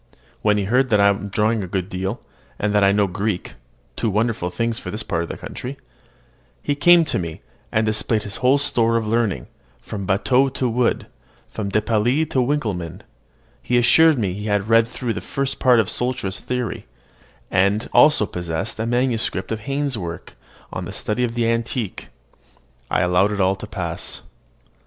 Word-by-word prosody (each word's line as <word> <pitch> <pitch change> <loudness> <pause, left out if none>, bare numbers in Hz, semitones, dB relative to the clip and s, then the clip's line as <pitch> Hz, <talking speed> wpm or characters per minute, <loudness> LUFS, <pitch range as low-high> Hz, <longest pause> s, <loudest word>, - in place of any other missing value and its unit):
When 105 -1 +3
he 100 - 0
heard 125 +6 +2
that 105 - +3
I 100 0 +6
am 100 0 -1
drawing 110 +1 +1
a - - -5
good 90 0 -2
deal, 95 +4 -4 0.4
and 105 0 -1
that 105 -1 +4
I 100 - +5
know 100 0 +3
Greek 100 +1 -3 0.4
(two 115 - -1
wonderful 105 -3 0
things 115 +5 -2
for - - -7
this 110 +1 -5
part 85 -5 -1
of 85 - -5
the - - -5
country), 135 +3 -7 0.9
he 145 - 0
came 170 +3 +6
to - - -3
see - - +1
me, 85 -3 -6 0.3
and 110 0 +2
displayed 110 0 0
his 105 +2 -6
whole 130 +2 +4
store 115 -5 +2
of 115 - -1
learning, 105 - 0 0.3
from 100 -3 -6
Batteaux 125 +7 +3
to 130 - 0
Wood, 120 +1 +1 0.5
from 105 -2 -4
De 105 +2 +1
Piles 120 +8 +2
to 130 - +2
Winkelmann: 110 - -2 0.6
he 125 - +1
assured 155 +6 +5
me 100 -6 -1
he 105 +3 -5
had 105 0 0
read 115 0 +5
through 120 -1 -3
the - - -5
first 135 0 -2
part 125 -3 +5
of 110 - +2
Sultzer's 120 -5 -2
theory, 125 -2 -4 0.6
and 100 +4 +2
also 150 -8 +6
possessed 90 +4 -4
a 110 - -1
manuscript 120 -2 0
of 110 - -2
Heyne's 140 -3 -1
work 85 -2 -7 0.4
on - - -4
the - - -7
study 110 +4 -1
of 120 -1 -2
the 120 -1 +1
antique. 115 -2 -2 0.8
I - - +1
allowed 90 +3 +3
it 100 - -4
all 95 0 +3
to 95 - -9
pass. 85 -4 -4
110 Hz, 190 wpm, -21 LUFS, 100-125 Hz, 0.9 s, I